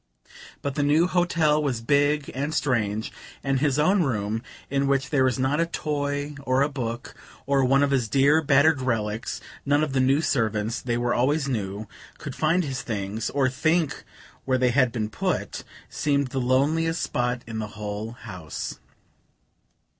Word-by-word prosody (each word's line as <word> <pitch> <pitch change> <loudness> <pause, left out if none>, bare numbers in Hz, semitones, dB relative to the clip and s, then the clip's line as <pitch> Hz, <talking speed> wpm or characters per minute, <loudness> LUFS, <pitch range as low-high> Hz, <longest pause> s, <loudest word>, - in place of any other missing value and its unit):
But 140 - -2
the 145 - -1
new 150 +4 +4
hotel 165 -4 +2
was 135 -6 -1
big 145 +4 +1
and 145 +4 -2
strange, 110 -7 0 0.3
and 135 -1 +1
his 145 -1 +1
own 185 +6 +3
room, 110 -6 -1 0.3
in 140 0 0
which 135 -1 0
there 135 -3 +3
was 130 0 +2
not 135 +3 +1
a 165 - +2
toy 145 -2 -2
or 130 0 +2
a 145 - 0
book, 120 -4 -5 0.3
or 140 -1 +2
one 135 +2 +4
of 140 - +1
his 125 -5 +1
dear 140 +6 +4
battered 145 0 +4
relics 110 -3 -2 0.2
(none 145 +2 +2
of 150 -3 -2
the 135 - +2
new 135 +2 +3
servants 110 -5 0
they 120 -1 -1
were 120 0 0
always 140 +4 +1
new 105 -4 -3 0.3
could 145 -4 -7
find 165 +4 +2
his 135 -4 -3
things, 105 0 -3
or 135 -2 +2
think 155 +4 0 0.4
where 130 -1 +1
they 125 -1 +2
had 130 -1 +3
been 110 -2 -2
put), 105 - -2 0.2
seemed 140 -2 0
the 130 +1 -2
loneliest 155 +6 +2
spot 125 0 -1
in 110 -1 -5
the 110 - -3
whole 105 +2 -4
house. 90 - -7
135 Hz, 170 wpm, -25 LUFS, 120-145 Hz, 0.4 s, new